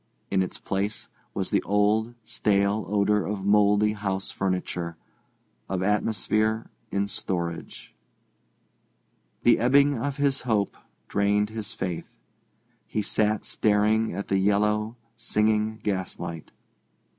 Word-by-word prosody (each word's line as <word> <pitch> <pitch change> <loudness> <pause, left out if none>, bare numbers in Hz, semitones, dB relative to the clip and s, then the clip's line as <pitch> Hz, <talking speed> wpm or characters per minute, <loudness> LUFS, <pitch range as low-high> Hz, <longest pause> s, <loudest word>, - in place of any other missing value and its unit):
In 95 - +3
its 95 - -3
place 100 +2 -3 0.3
was - - -2
the - - +3
old, 105 +3 +1
stale 100 0 +1
odour 105 +1 +2
of 100 +2 -3
mouldy 105 +1 +4
house 95 -2 -2
furniture, 90 -3 -2 0.7
of 95 -1 -1
atmosphere 110 +2 +1 0.2
in 100 0 0
storage. 85 -4 -4 1.5
The 120 - +5
ebbing 140 +4 +4
of 140 +2 -2
his 140 -2 +1
hope 110 -5 0 0.3
drained 105 +1 +1
his 110 0 -5
faith. 90 -3 -5 0.7
He 105 - -1
sat 105 +1 +1
staring 110 +1 +2
at 100 +3 -4
the 95 - +2
yellow, 105 +3 +1 0.2
singing 110 -1 +1
gaslight. 90 -4 -4
105 Hz, 110 wpm, -26 LUFS, 100-110 Hz, 1.5 s, The